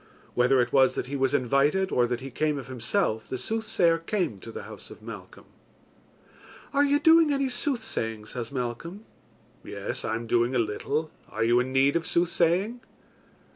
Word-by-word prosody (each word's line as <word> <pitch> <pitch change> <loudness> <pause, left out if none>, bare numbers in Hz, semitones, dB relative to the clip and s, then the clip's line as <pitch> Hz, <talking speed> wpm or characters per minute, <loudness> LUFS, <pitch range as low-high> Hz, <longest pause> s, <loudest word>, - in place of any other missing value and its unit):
Whether 125 +2 +3
it 120 - -2
was 135 -1 +5
that - - -2
he 140 +3 -5
was 135 0 +1
invited 140 +9 +2
or 120 -1 +3
that 120 0 -3
he 135 0 -7
came 150 +3 0
of 135 - -7
himself, 125 - -1
the 130 - -3
soothsayer 180 - +1
came 165 - -2
to 115 - -9
the - - -7
house - - -11
of - - -13
Malcolm. - - -10 1.3
"Are 285 - +4
you 285 0 +3
doing 320 0 +6
any 275 -1 +1
soothsaying?" 220 - -2
says 115 +1 -6
Malcolm. 140 - -5 0.6
"Yes, - - -5
I 110 - -1
am 115 +1 -4
doing 120 +2 +1
a - - +3
little. 140 +8 -1 0.2
Are - - -2
you 120 +2 +4
in 125 +1 -1
need 135 +2 +3
of 170 -1 -1
soothsaying?" 175 +7 +1
140 Hz, 175 wpm, -27 LUFS, 120-190 Hz, 1.3 s, doing